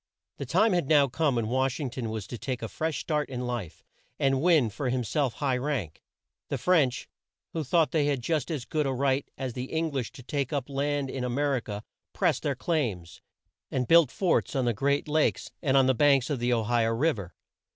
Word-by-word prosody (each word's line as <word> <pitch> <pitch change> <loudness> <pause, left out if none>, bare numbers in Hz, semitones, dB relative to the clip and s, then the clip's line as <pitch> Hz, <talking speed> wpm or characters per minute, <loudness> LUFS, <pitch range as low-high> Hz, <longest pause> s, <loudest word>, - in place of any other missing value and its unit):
The - - -5
time 220 -2 +3
had 175 -6 +1
now 145 -3 +5
come 145 +1 0
when 115 -2 0
Wash 130 +2 0
ing 135 -5 -3
ton 120 -2 -4
was 110 -3 -4
to 120 - -7
take 125 -3 -4
a - - -2
fresh 160 +6 -3
start 150 -2 -1
in 125 -1 -4
life, 115 -9 -5 0.3
and 135 -1 +2
win 155 -9 +4
for 130 +5 -3
him 125 0 0
self 130 +2 0
high 135 -3 0
rank. 125 - -3 0.5
The - - -2
French, 155 -9 +2 0.5
who 160 - -2
thought 160 +3 +2
they 150 -3 +2
had 140 -4 -1
just 155 0 -1
as 145 -7 -3
good 150 -2 -1
a - - 0
right 135 +1 0
as 130 -2 -4
the 125 +1 -5
Eng 160 0 0
lish 135 -4 -3
to 130 - -11
take 140 +1 -2
up 140 -2 -3
land 140 0 -1
in 130 - -4
A 125 - -1
mer 140 +3 +1
i - - 0
ca, 105 -3 -6 0.3
pressed - - +1
their - - -1
claims, 110 - -2 0.5
and 125 -2 -1
built 165 -5 +6
forts 180 -2 0
on 130 -2 +1
the 120 - +2
great 140 +7 0
Lakes 155 0 +1
and 135 -4 +2
on 135 - +5
the 130 - +4
banks 140 +1 +3
of 140 - -1
the 120 +1 0
O 115 -2 +2
hi 120 +1 +2
o 115 - +1
Riv 125 +2 +1
er. 90 -3 -8
135 Hz, 235 wpm, -28 LUFS, 120-150 Hz, 0.5 s, built